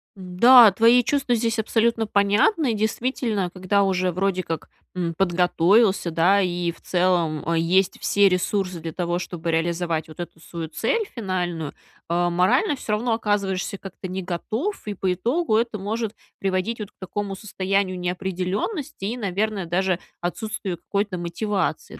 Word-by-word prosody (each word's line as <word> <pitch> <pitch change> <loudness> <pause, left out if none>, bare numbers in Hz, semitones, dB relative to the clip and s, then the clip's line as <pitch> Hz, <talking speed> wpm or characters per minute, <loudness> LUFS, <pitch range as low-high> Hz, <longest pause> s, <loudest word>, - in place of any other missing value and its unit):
Да, 210 +5 +7
твои 230 +5 +5
чувства 275 -2 0
здесь 230 0 0
абсолютно 225 +1 +1
понятны. 220 - +2
Действительно, 220 -2 -1
когда 185 +2 0
уже 185 -2 +1
вроде 185 +1 0
как, 165 -3 -5 0.3
м, 170 -2 -2
подготовился, 185 +2 +3
да. 175 +5 +4
И 175 -2 -1
в - - -18
целом, 175 -4 +1
э, 170 - +2
есть 180 +3 +2
все 200 -1 +4
ресурсы 185 0 -1
для 165 0 -6
того, 175 0 -1
чтобы 175 -2 -5
реализовать 165 0 -1
вот 155 - -13
эту 175 -1 -7
свою 165 0 -6
цель 455 - 0
финальную. 175 -7 -3 0.4
А, 175 +1 +1
морально 185 - +2
всё 255 - -6
равно 230 +2 0
оказываешься 200 -3 -1
как-то 190 0 -8
не 185 +1 -4
готов. 220 - -3
И 210 - -2
по 190 -1 -1
итогу 230 - +1
это 230 -2 -1
может 215 +2 -3 0.2
приводить 195 +4 -1
вот 210 -1 -6
к - - -62
такому 195 +1 -4
состоянию 195 -1 -1
неопределенности. 190 - -3
И, 230 +5 -2
наверное, 200 -2 -1
даже 185 +1 0 0.2
отсутствию 195 0 -3
какой-то 200 +2 -2
мотивации, 175 0 -2
190 Hz, 150 wpm, -23 LUFS, 175-215 Hz, 0.4 s, Да